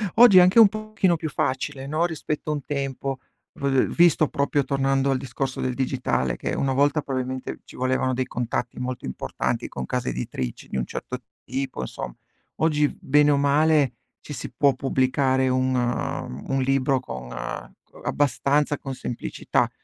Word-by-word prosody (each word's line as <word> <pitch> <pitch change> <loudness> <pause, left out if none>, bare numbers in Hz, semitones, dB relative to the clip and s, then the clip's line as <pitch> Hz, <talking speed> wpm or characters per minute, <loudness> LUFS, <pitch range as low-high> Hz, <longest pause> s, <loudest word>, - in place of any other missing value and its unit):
Oggi 230 -5 +8
è - - +11
anche 185 +6 +6
un 220 - +10
pochino 215 -4 0
più 160 -1 -4
facile, 135 0 -2
no, 155 +4 +1
rispetto 155 -2 -3
a - - +1
un 145 -3 -4
tempo, 135 -2 -3 0.3
v 140 - -3 0.2
v - - -6
visto 170 -3 +5
proprio 140 0 0
tornando 135 0 +1
al 130 - +2
discorso 130 +1 -4
del 130 -1 -1
digitale, 120 - 0
che - - -3
una 135 -1 0
volta 145 +2 +3
probabilmente 130 -1 -4
ci - - -15
volevano 130 0 0
dei 130 +1 0
contatti 120 0 -3
molto 125 -1 -4
importanti 65 - -2
con 65 - -5
case - - -2
editrici 65 0 -4
di - - -4
un - - 0
certo 125 - -5 0.3
tipo, 130 - -4
insom - - -5 0.4
oggi 150 -2 +3
v - - -8
bene 145 +1 +4
o 140 - +3
male 145 -1 +3 0.3
ci - - -11
si - - -6
può 140 -2 +3
pubblicare 130 0 +1
un 130 0 +1
uhm, 120 - -2
un 135 0 +1
libro 135 0 +2
con 65 - -7 0.5
co - - -18
abbastanza 145 0 +1
con 135 -1 -6
semplicità. 120 -1 -1
135 Hz, 170 wpm, -24 LUFS, 130-145 Hz, 0.5 s, è